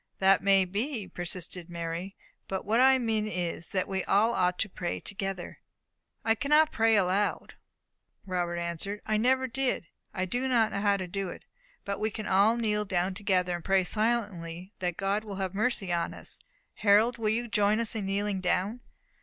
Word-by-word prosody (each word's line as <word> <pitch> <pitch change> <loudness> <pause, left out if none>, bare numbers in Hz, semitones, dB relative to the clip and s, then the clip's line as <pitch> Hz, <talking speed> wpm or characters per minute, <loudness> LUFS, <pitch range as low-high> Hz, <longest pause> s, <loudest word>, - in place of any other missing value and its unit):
"That 195 0 +4
may 195 -1 +4
be," 210 +3 -3
persisted 175 0 -5
Mary, 170 +3 -5 0.3
"but 190 - -3
what 225 +3 +2
I 265 +1 +6
mean 220 -3 0
is, 175 -4 -3
that 185 -1 -1
we 190 -1 -2
all 215 +4 +3
ought 180 -4 +1
to 220 - 0
pray 180 -2 -4
together." 195 -2 -5 0.7
"I 225 - +4
cannot 300 +6 +3
pray 225 0 +3
aloud," 200 +1 +1 0.7
Robert 175 -2 -2
answered; 170 +4 +1
"I 215 0 +1
never 260 +4 +2
did 260 -2 -1
it. - - -30 0.2
I 185 -2 -2
do 245 +7 -1
not 230 -4 +3
know 200 - -2
how 200 -1 +3
to 185 - -4
do 190 +1 -3
it. - - -9 0.4
But 200 0 -3
we 215 - 0
can 215 0 -6
all 205 +5 +4
kneel 210 -2 0
down 185 -1 -1
together, 185 -3 0
and 175 - -7
pray 195 -1 +3
silently 200 -4 -2
that 175 -2 -2
God 200 +2 0
will 205 -2 -7
have 190 -1 -3
mercy 205 -3 0
on 170 -1 -1
us. - - -8 0.4
Harold, 215 +4 +4
will 215 -1 +1
you 235 +2 0
join 210 0 +2
us 230 -2 -1
in 210 -4 -3
kneeling 200 0 -1
down?" 190 +5 0
200 Hz, 185 wpm, -29 LUFS, 185-220 Hz, 0.7 s, I